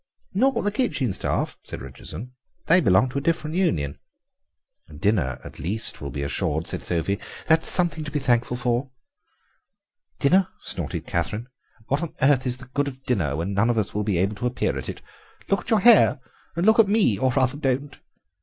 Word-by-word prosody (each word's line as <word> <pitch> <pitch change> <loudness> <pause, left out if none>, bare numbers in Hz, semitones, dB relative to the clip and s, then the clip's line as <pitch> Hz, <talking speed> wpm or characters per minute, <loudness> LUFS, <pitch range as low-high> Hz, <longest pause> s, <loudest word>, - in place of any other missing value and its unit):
"Not 265 +8 +2
the 205 - 0
kitchen 155 - -1
staff," - - -2
said - - -7
Richardson, 125 +6 -8 0.3
"they 175 +3 +5
belong 95 - +4
to 140 - -2
a - - -7
different 160 0 -1
union." 75 - 0 1.0
"Dinner 90 - 0
at - - -11
least 105 +7 +2
will 70 - -5
be 70 +1 -4
assured," 75 +3 -1
said - - -3
Sophie, 90 +4 -1 0.3
"that 160 0 +5
is - - +5
something 170 -3 +4
to - - -5
be 150 - -2
thankful 120 -3 +1
for." 125 +2 -1 1.3
"Dinner!" 185 +6 +3
snorted - - -4
Catherine, 105 +8 -3 0.4
"what 140 +5 -1
on 170 - -5
earth 135 -1 +3
is 125 0 -2
the 125 - -12
good 140 +3 -2
of 130 -1 -8
dinner 85 - 0
when 85 +6 -3
none 100 +4 +2
of 120 - +1
us 105 -3 -1
will 105 - -1
be 100 -4 0
able 95 +4 +1
to 120 - -1
appear 125 - -1
at - - -5
it? - - -8 0.5
Look 195 - +2
at - - -9
your 220 -4 +3
hair—and 185 - +3
look 220 +1 +5
at 220 - +6
me! 200 - +2
or 130 0 +2
rather, 130 +1 +1
don't." 140 0 -2
130 Hz, 190 wpm, -24 LUFS, 100-160 Hz, 1.3 s, at